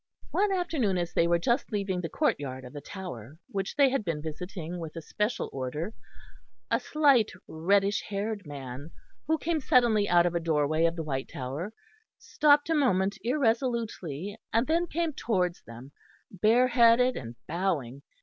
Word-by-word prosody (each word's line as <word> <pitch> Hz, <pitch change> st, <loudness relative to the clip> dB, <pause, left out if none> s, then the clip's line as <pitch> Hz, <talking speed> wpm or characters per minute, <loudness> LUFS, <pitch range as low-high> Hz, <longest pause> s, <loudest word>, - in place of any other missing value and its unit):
One 405 Hz, +1 st, +2 dB
afternoon 315 Hz, -, 0 dB
as 175 Hz, -1 st, -2 dB
they 170 Hz, -, +3 dB
were 170 Hz, 0 st, +3 dB
just 235 Hz, -, 0 dB
leaving 195 Hz, -3 st, -1 dB
the 165 Hz, -, -4 dB
courtyard 130 Hz, -3 st, -1 dB
of 125 Hz, -, -11 dB
the 145 Hz, -, -7 dB
Tower, 155 Hz, -, -8 dB
which 195 Hz, -1 st, -3 dB
they 280 Hz, -2 st, +5 dB
had 270 Hz, -4 st, 0 dB
been 165 Hz, -5 st, -2 dB
visiting 170 Hz, +2 st, -6 dB
with 160 Hz, -2 st, -7 dB
a 165 Hz, -, -5 dB
special 210 Hz, +8 st, -1 dB
order, 145 Hz, -, -4 dB, 0.8 s
a -, -, +3 dB
slight 280 Hz, -8 st, +3 dB, 0.2 s
reddish 195 Hz, +5 st, +2 dB
haired 205 Hz, -2 st, -3 dB
man, 140 Hz, 0 st, -7 dB, 0.4 s
who 320 Hz, +1 st, +2 dB
came 325 Hz, 0 st, -1 dB
suddenly 235 Hz, -6 st, +3 dB
out 175 Hz, 0 st, +5 dB
of 175 Hz, -, +1 dB
a 170 Hz, -, +1 dB
doorway 155 Hz, -1 st, +1 dB
of 165 Hz, 0 st, +1 dB
the 165 Hz, -, -3 dB
White 135 Hz, -3 st, -3 dB
Tower, 140 Hz, +10 st, -5 dB, 0.5 s
stopped 290 Hz, -1 st, +3 dB
a -, -, +4 dB
moment 200 Hz, -9 st, +2 dB
irresolutely, 230 Hz, -, -1 dB, 0.2 s
and 230 Hz, +3 st, +2 dB
then 335 Hz, +3 st, +1 dB
came 330 Hz, -1 st, -1 dB
towards 180 Hz, -9 st, -1 dB
them, 120 Hz, +4 st, -12 dB, 0.4 s
bare 225 Hz, +6 st, +3 dB
headed 240 Hz, +1 st, +5 dB
and 115 Hz, -1 st, -7 dB
bowing. 155 Hz, -7 st, -2 dB
190 Hz, 165 wpm, -28 LUFS, 155-240 Hz, 0.8 s, they